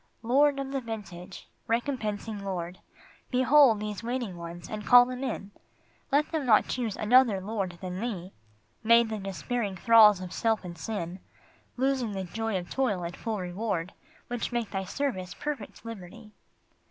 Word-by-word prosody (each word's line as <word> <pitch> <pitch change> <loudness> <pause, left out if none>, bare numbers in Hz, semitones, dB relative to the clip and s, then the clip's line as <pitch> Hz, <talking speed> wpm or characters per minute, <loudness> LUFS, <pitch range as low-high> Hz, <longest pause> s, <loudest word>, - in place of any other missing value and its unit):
Lord 280 +4 +4
of 270 -1 -4
the 270 -1 -1
vintage, 195 -6 -8 0.2
recompensing 225 -4 -2
Lord, 180 -2 -4 0.5
Behold 255 -2 +5
these 210 -1 -4
waiting 235 -4 -3
ones 170 0 -8
and 215 -1 -5
call 245 +3 +8
them 255 +1 -5
in, 215 -6 -4 0.6
Let 290 +2 +2
them 320 -3 -1
not 225 -5 +4
choose 235 -5 -2
another 230 -2 +4
Lord 190 -3 -3
than 185 -1 -5
Thee, 200 -6 -4 0.5
Made 230 0 +5
the 215 -1 -3
despairing 195 +3 -3
thralls 215 -2 +7
of 185 -1 -7
self 225 -2 +1
and 175 -1 -7
sin, 180 -1 -4 0.6
Losing 260 -4 0
the 190 -1 -3
joy 225 +3 -2
of 175 -1 -7
toil 225 -9 0
and 170 +1 -5
full 225 -2 -3
reward 185 -1 -3 0.3
Which 245 0 -3
make 235 -3 -2
Thy 195 -1 -2
service 185 -8 -3
perfect 290 -6 -6
liberty. 215 0 -9
215 Hz, 155 wpm, -28 LUFS, 185-245 Hz, 0.6 s, call